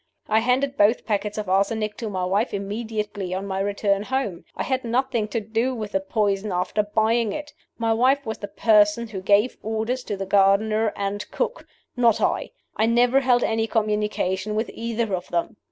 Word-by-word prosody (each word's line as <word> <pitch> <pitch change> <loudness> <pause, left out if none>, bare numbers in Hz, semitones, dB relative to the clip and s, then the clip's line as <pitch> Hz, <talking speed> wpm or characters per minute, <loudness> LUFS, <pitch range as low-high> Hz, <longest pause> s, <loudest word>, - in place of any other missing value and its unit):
"I 220 +1 +3
handed 260 +4 +1
both 210 +4 +3
packets 210 -1 -1
of 210 -2 -3
arsenic 210 +3 +1
to 225 - -4
my 185 -2 -2
wife 200 +5 0
immediately 205 -2 -4
on 190 +1 -3
my 190 -1 -3
return 200 0 0
home. 215 -6 -3
I - - -2
had 260 0 -1
nothing 240 -1 0
to 230 - -2
do 225 +4 -1
with 215 -3 -5
the 195 - +1
poison 200 0 -1
after 180 +3 0
buying 220 +1 +1
it. 300 -1 -6 0.2
My 225 -1 +1
wife 260 +4 +2
was 220 0 -4
the 205 - -5
person 215 +1 +3
who 195 -3 -5
gave 205 +5 +3
orders 225 +4 -2
to 205 - -3
the 195 - -3
gardener 205 +3 +3
and 200 +1 -3
cook - - -3 0.3
not 235 -3 +3
I. - - 0 0.3
I 220 - +2
never 245 +3 +4
held 245 -2 +3
any 225 0 0
communication 210 -2 -1
with 220 +2 -1
either 230 -2 -2
of 180 -1 -3
them. 175 +5 -2
215 Hz, 185 wpm, -24 LUFS, 200-235 Hz, 0.3 s, never